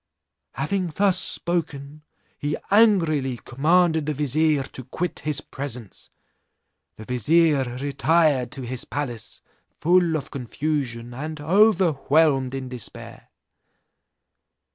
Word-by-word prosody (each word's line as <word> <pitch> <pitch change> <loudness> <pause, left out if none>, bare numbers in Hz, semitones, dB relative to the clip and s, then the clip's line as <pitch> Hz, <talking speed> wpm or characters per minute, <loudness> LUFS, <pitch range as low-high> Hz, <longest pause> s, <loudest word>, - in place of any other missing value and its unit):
Having 180 +7 -1
thus 190 -2 +3
spoken, 155 -6 -2 0.4
he 145 +1 -2
angrily 165 - +3
commanded 160 +5 +1
the 150 - -1
vizier 150 +1 +1
to 130 -1 -9
quit 180 +6 -4
his 150 -2 -1
presence. 125 -7 -7 0.9
The 110 - -11
vizier 135 +1 +2
retired 145 -1 +1
to 135 - -7
his 125 +1 -4
palace 120 -6 -6 0.4
full 175 -1 +3
of 140 - -8
confusion, 125 -2 -3
and 150 +4 -6
overwhelmed 160 - +3
in 130 -1 -5
despair. 125 -3 -7
145 Hz, 100 wpm, -23 LUFS, 130-165 Hz, 0.9 s, thus